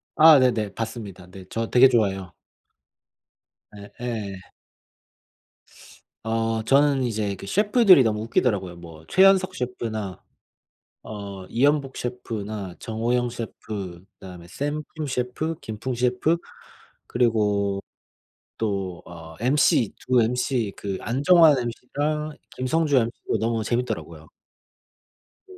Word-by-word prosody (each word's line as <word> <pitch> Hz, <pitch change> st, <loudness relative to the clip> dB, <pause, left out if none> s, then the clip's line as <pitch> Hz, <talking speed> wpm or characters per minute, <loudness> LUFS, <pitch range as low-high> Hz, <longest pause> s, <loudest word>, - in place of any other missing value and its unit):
아 155 Hz, -1 st, +8 dB
네네. 115 Hz, -6 st, +1 dB
봤습니다. 110 Hz, -5 st, -6 dB
네. 95 Hz, -1 st, -11 dB
저 115 Hz, 0 st, -3 dB
되게 130 Hz, +1 st, +7 dB
좋아해요. 95 Hz, -5 st, 0 dB, 1.4 s
예 100 Hz, 0 st, -11 dB
예. 105 Hz, -6 st, -4 dB, 1.9 s
어 115 Hz, 0 st, -1 dB
저는 140 Hz, +1 st, +3 dB
이제 105 Hz, -4 st, -2 dB
그 100 Hz, -, -10 dB
셰프들이 205 Hz, -, +5 dB
너무 105 Hz, -2 st, 0 dB
웃기더라고요. 100 Hz, -6 st, 0 dB
뭐 80 Hz, -2 st, -12 dB
최현석 190 Hz, 0 st, +4 dB
셰프나 110 Hz, -, -4 dB, 0.8 s
어 100 Hz, -3 st, -8 dB
이연복 140 Hz, +4 st, +1 dB
셰프나 110 Hz, -6 st, -5 dB
정호영 120 Hz, +2 st, -1 dB
셰프 100 Hz, -6 st, -7 dB, 0.2 s
그다음에 90 Hz, -2 st, -11 dB
샘프로 150 Hz, -, -4 dB
셰프 130 Hz, +5 st, -2 dB
김풍 110 Hz, +4 st, -5 dB
셰프 125 Hz, +7 st, +1 dB, 0.7 s
그리고 105 Hz, -4 st, +1 dB, 0.8 s
또 95 Hz, -5 st, -3 dB
어 80 Hz, -1 st, -11 dB
mc 125 Hz, -4 st, +3 dB
두 125 Hz, -1 st, +2 dB
mc 120 Hz, -1 st, 0 dB
그 100 Hz, -2 st, -4 dB
안정환 145 Hz, +4 st, +5 dB
mc랑 145 Hz, +6 st, -3 dB, 0.2 s
김성주 145 Hz, +3 st, +1 dB
mc도 115 Hz, -1 st, -1 dB
너무 115 Hz, 0 st, -1 dB
재밌더라고요. 125 Hz, +2 st, -3 dB, 1.2 s
네. 380 Hz, -, -14 dB
115 Hz, 230 characters per minute, -24 LUFS, 100-135 Hz, 1.9 s, 아